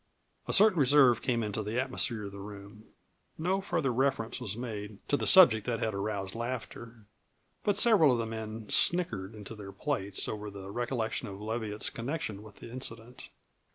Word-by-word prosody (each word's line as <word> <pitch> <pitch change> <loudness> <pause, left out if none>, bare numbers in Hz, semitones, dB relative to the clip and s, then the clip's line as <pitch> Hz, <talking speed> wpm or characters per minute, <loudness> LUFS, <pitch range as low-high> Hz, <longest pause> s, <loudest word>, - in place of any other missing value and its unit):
A - - -1
certain 205 -3 +6
reserve 135 -3 +5
came 120 -3 0
into 105 0 -3
the 110 +3 -2
atmosphere 125 -4 0
of 100 - -6
the 100 - -10
room. 100 +1 -10 0.5
No 185 +4 0
further 165 -9 -1
reference 130 -2 0
was 105 -3 -4
made 105 -4 -6
to - - +3
the - - -1
subject 125 - +7
that 115 -2 -1
had 110 - -1
aroused 100 -1 -3
laughter, 115 -1 -6 0.6
but 205 -1 +1
several 210 - +5
of 125 - +2
the 115 - -1
men 110 -1 -6
snickered 110 - +1
into 105 +1 -9
their 100 -3 -9
plates 95 0 -2
over 105 -1 -5
the 100 -1 -9
recollection 120 0 -2
of 100 -1 -8
Leviatt's 110 -1 -2
connection 115 -5 -4
with 105 -2 -13
the - - -11
incident. 120 -1 -8
115 Hz, 175 wpm, -30 LUFS, 105-130 Hz, 0.6 s, subject